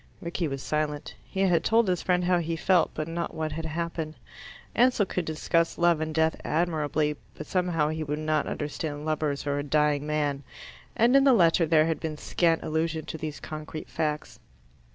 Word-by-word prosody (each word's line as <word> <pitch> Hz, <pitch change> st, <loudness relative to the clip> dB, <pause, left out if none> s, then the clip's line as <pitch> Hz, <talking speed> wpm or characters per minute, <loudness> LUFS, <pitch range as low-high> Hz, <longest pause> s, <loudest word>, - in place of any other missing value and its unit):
Rickie 170 Hz, 0 st, -2 dB
was 135 Hz, -2 st, -5 dB
silent. 150 Hz, -1 st, -2 dB
He 195 Hz, -, -4 dB
had 180 Hz, -4 st, +3 dB
told 225 Hz, -1 st, +3 dB
his 180 Hz, -2 st, +1 dB
friend 180 Hz, -1 st, +1 dB
how 180 Hz, 0 st, +3 dB
he 165 Hz, 0 st, -2 dB
felt, 175 Hz, +1 st, +3 dB
but 155 Hz, 0 st, -3 dB
not 170 Hz, +1 st, -4 dB
what 155 Hz, -1 st, -2 dB
had 160 Hz, +2 st, -4 dB
happened. 160 Hz, -1 st, -3 dB, 0.6 s
Ansell 245 Hz, -4 st, +4 dB
could 180 Hz, -2 st, -3 dB
discuss 165 Hz, +1 st, 0 dB
love 170 Hz, -2 st, +3 dB
and 155 Hz, 0 st, -2 dB
death 160 Hz, 0 st, +1 dB
admirably, 155 Hz, -2 st, 0 dB, 0.2 s
but -, -, -7 dB
somehow 175 Hz, -5 st, +1 dB
he 155 Hz, 0 st, -2 dB
would 150 Hz, 0 st, -2 dB
not 155 Hz, -1 st, 0 dB
understand 150 Hz, 0 st, -4 dB
lovers 155 Hz, -2 st, -1 dB
or 145 Hz, 0 st, 0 dB
a -, -, -2 dB
dying 150 Hz, 0 st, +1 dB
man, 145 Hz, -2 st, 0 dB, 0.5 s
and 240 Hz, +4 st, +4 dB
in 275 Hz, -, +7 dB
the 270 Hz, -2 st, +6 dB
letter 170 Hz, -5 st, +4 dB
there 155 Hz, -1 st, +5 dB
had 165 Hz, -1 st, -1 dB
been 155 Hz, -2 st, -4 dB
scant 165 Hz, +1 st, +1 dB
allusion 160 Hz, 0 st, -1 dB
to -, -, -5 dB
these 155 Hz, -1 st, -5 dB
concrete 155 Hz, 0 st, -7 dB
facts. 150 Hz, -1 st, -3 dB
160 Hz, 190 wpm, -27 LUFS, 150-170 Hz, 0.6 s, in